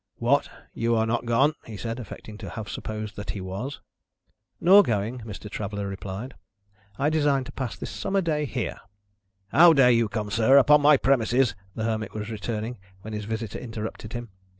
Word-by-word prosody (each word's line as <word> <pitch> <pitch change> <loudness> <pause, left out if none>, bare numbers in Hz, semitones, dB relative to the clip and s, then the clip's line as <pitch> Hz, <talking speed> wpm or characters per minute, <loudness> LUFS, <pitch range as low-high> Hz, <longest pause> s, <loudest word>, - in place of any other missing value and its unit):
"What? 125 +5 +2 0.2
You 115 0 +1
are 110 0 +2
not 120 +1 -1
gone?" 135 +6 +3
he 110 -2 -7
said, 115 +3 -4
affecting 110 -1 -9
to - - -7
have 110 -2 -6
supposed 110 -1 -5
that 105 - -7
he 100 - -3
was. 100 +10 -5 0.8
"Nor 195 +4 +8
going," 115 - -1
Mr. 110 -2 -8
Traveller 100 -1 -4
replied: 100 +6 -6 0.6
"I 145 +2 +1
design 145 -4 +2
to - - -9
pass 130 -5 -4
this - - -6
summer 195 0 -1
day 155 -4 0
here." 125 -3 -3 0.7
"How 165 +8 +7
dare 135 -4 +6
you 115 -2 +3
come, 105 -1 -3
sir, 115 +6 +5
upon 150 +2 +6
my 145 0 +7
promises 125 -2 +2
" 95 - -32
the 110 - -3
Hermit 110 -1 -2
was 105 +1 -4
returning, 110 +1 -4 0.2
when 110 +2 -8
his 105 -1 -4
visitor 110 0 -4
interrupted 110 -2 -6
him. 120 -1 -5
115 Hz, 185 wpm, -26 LUFS, 105-135 Hz, 0.8 s, Nor